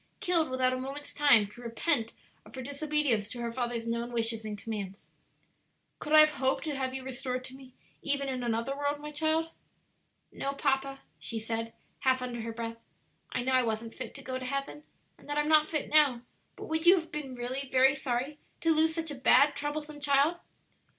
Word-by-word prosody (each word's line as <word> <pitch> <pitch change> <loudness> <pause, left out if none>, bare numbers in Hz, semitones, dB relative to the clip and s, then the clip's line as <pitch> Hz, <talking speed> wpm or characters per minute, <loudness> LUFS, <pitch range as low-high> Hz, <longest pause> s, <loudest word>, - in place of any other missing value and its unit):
killed 335 -4 +2
without 255 0 +1
a 255 - -2
moment's 275 +3 -6
time 280 -8 +5
to 210 +4 -13
repent 230 0 +1 0.3
of - - -14
her 260 - -5
disobedience 285 -6 0
to 250 - -7
her 235 -1 -3
father's 240 -1 -3
known 235 +1 -2
wishes 225 -1 +1
and 210 -1 -5
commands? 200 -2 -6 0.9
Could 300 - -6
I 310 0 +10
have 305 0 +5
hoped 265 -2 0
to 305 -3 -3
have 260 -1 -2
you 265 - -5
restored 255 -1 -4
to 260 - -8
me 260 -1 -15 0.3
even 280 -1 -1
in 260 -2 -3
another 235 +3 -1
world, 285 +1 -1
my 300 0 -7
child?" 315 +2 0 0.8
"No, 275 - -3
papa," 275 -1 -1 0.2
she 230 - -4
said, 225 +1 -3 0.3
half 260 -2 +2
under 240 -2 -4
her 230 +1 -4
breath; 230 0 -5 0.5
"I 255 - -2
know 260 +1 0
I 255 - +5
wasn't 225 -1 -3
fit - - -7
to 275 - -8
go 260 0 -4
to 255 - -6
heaven, 275 +2 -3 0.4
and - - -17
that 290 - -1
I'm 295 0 +2
not 310 0 +5
fit 305 -3 -2
now; 285 -6 +4 0.3
but - - -8
would 320 +1 -2
you 365 - +9
have 335 -3 -4
been 280 -4 -5
really 255 +3 -4
very 265 +1 +5
sorry 270 +1 -3 0.2
to 330 - +3
lose 320 0 +3
such 325 -2 -2
a 270 -3 -8
bad, 280 +3 +6
troublesome 295 0 -4
child?" 290 +3 +3
265 Hz, 205 wpm, -30 LUFS, 240-295 Hz, 0.9 s, I